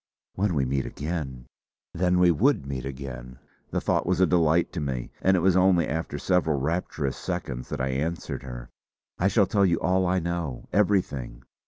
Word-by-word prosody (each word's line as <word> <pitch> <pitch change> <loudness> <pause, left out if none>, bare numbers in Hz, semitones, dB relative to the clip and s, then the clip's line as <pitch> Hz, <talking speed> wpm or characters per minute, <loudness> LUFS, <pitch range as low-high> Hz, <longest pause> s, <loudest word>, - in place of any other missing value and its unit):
When 95 -2 0
we 70 -2 +1
meet 65 +1 -1
again! 70 -6 -5 0.5
Then 90 +1 +2
we 90 -1 +5
would 110 - +2
meet 65 -2 -4
again: 65 -2 -7 0.3
The - - -1
thought - - 0
was 90 0 +1
a 95 - +6
delight 85 0 +2
to 90 - -3
me; 65 -5 -3
and 95 0 +4
it - - +1
was 95 0 +3
only 90 -3 +4
after 80 -1 -3
several 80 -3 +1
rapturous 75 -2 -2
seconds 60 -2 -4
that - - -4
I 65 +1 0
answered 75 +6 -3
her: - - -8 0.5
"I 95 - +3
shall 100 0 +4
tell 100 +1 +2
you 85 -3 +3
all 95 0 +2
I 90 +1 +2
know; 85 -6 -3
everything. 90 -12 0
80 Hz, 185 wpm, -26 LUFS, 65-90 Hz, 0.5 s, a